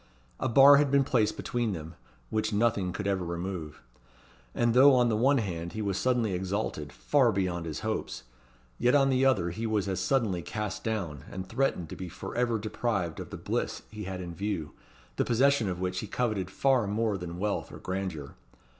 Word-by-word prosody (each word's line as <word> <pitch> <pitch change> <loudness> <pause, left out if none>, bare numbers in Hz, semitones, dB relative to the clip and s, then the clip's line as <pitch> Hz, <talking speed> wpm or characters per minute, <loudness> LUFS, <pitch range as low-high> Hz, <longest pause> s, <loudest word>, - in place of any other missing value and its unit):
A 130 - 0
bar 140 +4 +8
had 145 0 +3
been 140 0 +4
placed 110 -5 +1
between 120 -4 -1
them, 80 -1 -7 0.4
which 110 0 0
nothing 105 -3 +1
could 105 +2 -5
ever 95 -2 0
remove. 85 -2 -5 0.7
And 120 -1 +2
though, 135 +2 +7
on 120 -1 +4
the 110 - +1
one 135 +6 +3
hand, 85 -7 -3
he 110 - -4
was 100 -2 -1
suddenly 120 -3 +1
exalted 90 -5 -3
far 135 -5 +2
beyond 90 -4 -1
his 80 - -5
hopes; - - -3 0.6
yet 125 +3 +3
on 135 -1 +4
the 130 0 +2
other 95 -10 +2
he 110 +6 -3
was 105 -3 0
as 95 -2 -1
suddenly 110 -10 +1
cast 105 +2 -4
down, 90 - -3
and 95 0 -6
threatened 115 -6 0
to - - -6
be 90 -1 -6
for - - -8
ever 120 -1 +1
deprived 105 -5 -2
of - - -7
the - - -7
bliss - - -3
he 105 -2 -7
had 95 -1 -5
in 85 -1 -6
view, 95 -4 -3 0.5
the - - +3
possession 125 -2 +3
of 90 -1 -3
which 90 0 -2
he 110 - -5
coveted 105 -5 -1
far 130 +1 +2
more 105 +1 0
than 90 -2 -6
wealth 100 +2 -2
or - - -9
grandeur. 90 -7 -4
105 Hz, 200 wpm, -29 LUFS, 90-120 Hz, 0.7 s, bar